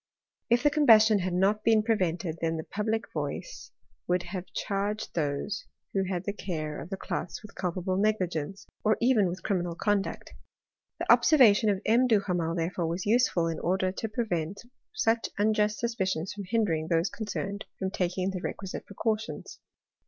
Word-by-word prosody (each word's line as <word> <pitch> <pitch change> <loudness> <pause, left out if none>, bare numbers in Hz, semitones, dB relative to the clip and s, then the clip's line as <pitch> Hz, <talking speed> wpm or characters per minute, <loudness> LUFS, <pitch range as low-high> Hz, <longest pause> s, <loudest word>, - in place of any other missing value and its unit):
If 235 +2 +3
the 295 - +5
combustion 225 -8 +6
had 180 -1 -2
not 200 +3 +2
been 220 -1 +4
pre 225 +1 +3
vented, 170 -4 -2
then 165 0 0
the 160 - -4
public 220 +4 -2
voice - - -5 0.4
would 180 0 +1
have 180 +1 -6
charged 205 +2 -2
those 155 +6 -2 0.3
who 195 - +1
had 180 -1 -2
the 200 - -2
care 155 -7 -4
of - - -9
the 195 - -4
cloths 185 - -4
with 210 - -12
culpable 185 +1 -2
negligence, 195 -4 -1 0.2
or 215 0 +3
even 235 -5 +4
with 180 +2 -5
criminal 175 -4 -1
conduct. 205 +1 -1 0.6
The - - +1
observation 225 -8 +6
of 195 -2 0
M. 240 +4 +4
Duhamel, 180 -7 +1
therefore, 170 0 -1
was 170 +2 -3
useful, 215 -6 +3
in 165 - -3
order 185 +1 +1
to 220 +4 -4
prevent 200 -5 -2 0.3
such 230 - +1
unjust 210 0 +2
suspicions 190 -7 -1
from 200 -1 -7
hindering 180 -7 0
those 165 +2 +1
concerned 200 -2 -4
from 190 -1 -2
taking 185 +1 -1
the 185 -2 -5
requisite 195 0 -5
precautions. 220 +2 -3
195 Hz, 165 wpm, -28 LUFS, 175-215 Hz, 0.6 s, combustion